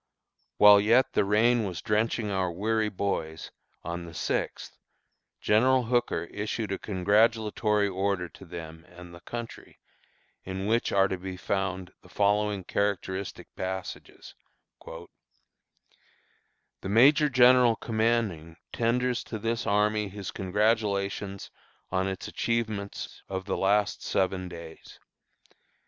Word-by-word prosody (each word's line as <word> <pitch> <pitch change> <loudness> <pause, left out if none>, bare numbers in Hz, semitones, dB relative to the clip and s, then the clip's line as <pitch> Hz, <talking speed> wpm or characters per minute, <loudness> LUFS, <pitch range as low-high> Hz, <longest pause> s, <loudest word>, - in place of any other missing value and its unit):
While 105 -1 +8
yet 115 +5 +3
the - - +3
rain 110 +4 +3
was 90 -5 -4
drenching 110 0 0
our 95 -2 0
weary 110 +4 0
boys, 85 -5 -3 0.3
on 85 +1 -5
the 85 -1 -11
sixth, - - -3 0.6
General 125 +4 +3
Hooker 120 -7 0
issued 105 0 -3
a 95 - -2
congratulatory 105 +1 +2
order 95 -1 -1
to 95 - -15
them 80 -2 -9
and 90 0 -13
the 85 - -11
country, 120 +5 -8 0.7
in 95 +1 -5
which 115 +3 +1
are 95 0 +4
to 95 -2 -4
be 95 0 -6
found 95 -1 -3
the - - -18
following 105 -1 +1
characteristic 100 -1 -3
passages: 95 0 -6 0.5
"The - - -9 1.8
Major 145 +8 +5
General 125 -2 +6
commanding 110 -9 -1 0.2
tenders 125 +1 0
to 110 - -5
this 115 +1 -2
army 105 0 +1
his 100 0 -7
congratulations 100 -1 -1 0.4
on 95 +1 0
its 95 -1 -5
achievements 110 -4 -3
of 95 0 -4
the 95 - -2
last 100 +1 +1
seven 95 -1 -1
days. 85 -2 -11
100 Hz, 120 wpm, -27 LUFS, 95-110 Hz, 1.8 s, While